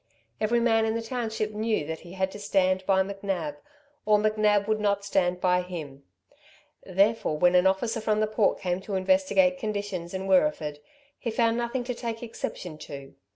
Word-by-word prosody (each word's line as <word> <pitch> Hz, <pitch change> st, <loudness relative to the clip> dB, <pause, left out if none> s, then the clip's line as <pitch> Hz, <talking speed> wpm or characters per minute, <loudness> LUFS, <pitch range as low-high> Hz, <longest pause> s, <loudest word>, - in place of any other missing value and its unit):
Every 230 Hz, +2 st, +2 dB
man 225 Hz, -1 st, +3 dB
in 220 Hz, 0 st, 0 dB
the 230 Hz, -, -1 dB
township 225 Hz, -3 st, -3 dB
knew 215 Hz, -6 st, -1 dB
that 160 Hz, +1 st, -5 dB
he 175 Hz, -, -12 dB
had 190 Hz, 0 st, -1 dB
to 205 Hz, -, -9 dB
stand 190 Hz, -2 st, +1 dB
by 190 Hz, -1 st, +4 dB
McNab, 200 Hz, +8 st, -4 dB, 0.5 s
or 210 Hz, 0 st, +4 dB
McNab 210 Hz, -1 st, +2 dB
would 215 Hz, 0 st, +1 dB
not 200 Hz, -1 st, 0 dB
stand 180 Hz, -2 st, +1 dB
by 180 Hz, 0 st, +2 dB
him; 155 Hz, -7 st, -8 dB, 0.8 s
therefore 195 Hz, -3 st, +1 dB
when 175 Hz, +3 st, +4 dB
an 180 Hz, +1 st, +5 dB
officer 225 Hz, +4 st, 0 dB
from 215 Hz, -1 st, +1 dB
the 215 Hz, -, +3 dB
Port 215 Hz, -1 st, +1 dB
came 180 Hz, 0 st, -2 dB
to 195 Hz, 0 st, -4 dB
investigate 275 Hz, +6 st, +3 dB
conditions 205 Hz, -6 st, -4 dB
in 190 Hz, 0 st, -3 dB
Wirreeford, 185 Hz, -, +2 dB, 0.4 s
he 240 Hz, -, -3 dB
found 230 Hz, 0 st, +2 dB
nothing 240 Hz, +1 st, -2 dB
to 250 Hz, +1 st, -3 dB
take 230 Hz, -1 st, -5 dB
exception 180 Hz, -8 st, -6 dB
to. 140 Hz, -2 st, -9 dB
205 Hz, 180 wpm, -27 LUFS, 185-225 Hz, 0.8 s, an